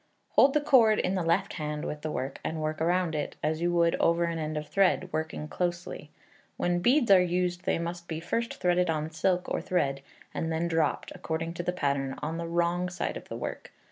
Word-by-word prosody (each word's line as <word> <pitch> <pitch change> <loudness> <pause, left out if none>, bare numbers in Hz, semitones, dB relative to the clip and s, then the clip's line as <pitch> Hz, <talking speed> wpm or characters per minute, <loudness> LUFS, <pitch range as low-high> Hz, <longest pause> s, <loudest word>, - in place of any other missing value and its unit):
Hold 275 +1 +5
the 300 - +4
cord 230 -7 +5
in 185 - 0
the 190 - 0
left 170 +3 +1
hand 150 0 -3
with 150 - -4
the 155 - -3
work, 135 -2 -4
and 160 - -3
work 155 0 -2
round 175 +1 +1
it, 150 -1 -3
as 155 +2 0
you 175 0 +2
would 170 -1 +3
over 170 +1 +3
an 170 -1 -1
end 155 0 -3
of 150 0 -4
thread, 190 -1 +2
working 155 -1 -3
closely. 175 -2 -3 0.5
When 175 0 +1
beads 245 +3 +3
are 190 -2 +8
used 180 0 -1
they - - +2
must 170 +1 -5
be 160 -1 -3
first 230 +7 -2
threaded 180 -1 +2
on 155 0 -1
silk 180 +3 0
or - - -1
thread, 140 -7 0 0.3
and 165 - -2
then 165 +2 0
dropped, 165 -3 0
according 165 +1 -3
to 175 - -4
the 180 - -1
pattern, 140 -5 -1
on 160 +2 -3
the 170 - -3
wrong 170 +1 0
side 180 - -3
of - - -9
the - - -5
work. - - -6
170 Hz, 220 wpm, -28 LUFS, 155-180 Hz, 0.5 s, are